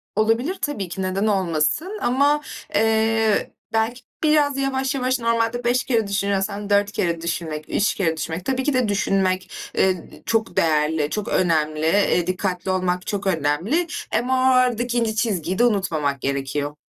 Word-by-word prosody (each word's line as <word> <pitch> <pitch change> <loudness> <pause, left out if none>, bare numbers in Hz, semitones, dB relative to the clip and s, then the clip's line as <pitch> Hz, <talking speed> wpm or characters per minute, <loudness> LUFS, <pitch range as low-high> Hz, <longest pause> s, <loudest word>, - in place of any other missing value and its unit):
Olabilir, 225 - +1
tabii 290 -11 -3
ki, 190 - -5
neden 190 +3 0
olmasın; 195 - 0
ama, 285 +4 +2 0.3
eee, 220 0 +2 0.2
belki 225 +3 0 0.2
biraz 295 -2 +3
yavaş 270 0 -1
yavaş, 255 0 0
normalde 230 +1 0
5 245 +1 +2
kere 225 -5 0
düşünüyorsan 200 +1 -1
4 205 0 +3
kere 170 -4 -1
düşünmek, 160 -2 -3
3 205 - +1
kere 165 -5 0
düşünmek. 165 +3 -4
Tabii 260 -1 0
ki 290 +1 +1
de 255 -3 +2
düşünmek, 190 -2 0 0.3
eee, 185 -3 +1
d - - -16
çok 225 0 -1
değerli, 155 -1 +2
çok 210 -2 -3
önemli; 155 -3 +1
eee, 180 -1 +2
dikkatli 185 0 -2
olmak 180 -1 -1
çok 200 -1 -2
önemli. 180 - 0 0.2
Hem, 245 - -1
o, 260 - +2
aradaki 250 -2 +2
ince 225 -2 0
çizgiyi 190 -5 -1
de - - +5
unutmamak 160 - 0
gerekiyor. 140 +1 -2
205 Hz, 155 wpm, -22 LUFS, 175-245 Hz, 0.3 s, de